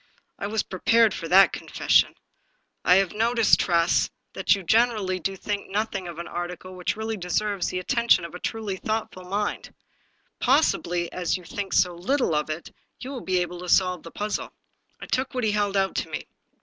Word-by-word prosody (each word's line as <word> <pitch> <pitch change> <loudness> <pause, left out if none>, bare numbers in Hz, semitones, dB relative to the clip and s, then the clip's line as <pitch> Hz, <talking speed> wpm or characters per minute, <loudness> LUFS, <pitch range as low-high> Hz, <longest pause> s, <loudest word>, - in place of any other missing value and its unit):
" - - -48
I 200 - -2
was 215 +1 0
prepared 225 +3 +3
for 165 - -5
that 190 +3 +6
confession. - - +2 0.7
I 180 - +6
have 195 -2 +3
noticed, 230 +1 +3
Tress, 170 -1 +2 0.2
that - - +3
you 195 - -7
gener 230 +6 +3
ally 185 -2 -2
do 195 +3 -2
think 200 +1 -4
nothing 205 -2 -2
of 170 -2 -8
an 170 0 -6
article 180 +1 -6
which 180 -1 -2
really 220 0 -3
deserves 195 +2 -1
the - - -3
attention 185 0 +2
of 170 - -9
a 180 - -7
truly 210 -3 -3
thoughtful 215 -3 -3
mind. 205 +3 -3 0.7
Possibly, 180 - +2
as 180 0 -1
you 180 - -13
think 195 +2 -5
so 180 -1 +3
little 195 - 0
of 150 0 0
it, 155 +2 -5 0.3
you 260 - -7
will 260 -3 -5
be 185 -1 0
able 175 0 -4
to 180 0 -7
solve 180 -2 +3
the 165 - -10
puzzle." 210 +4 -3 0.5
I - - -7
took 260 0 -2
what 250 - -1
he 215 - +2
held 205 -1 0
out 195 0 +1
to - - -2
me. - - -5
195 Hz, 200 wpm, -25 LUFS, 180-220 Hz, 0.7 s, that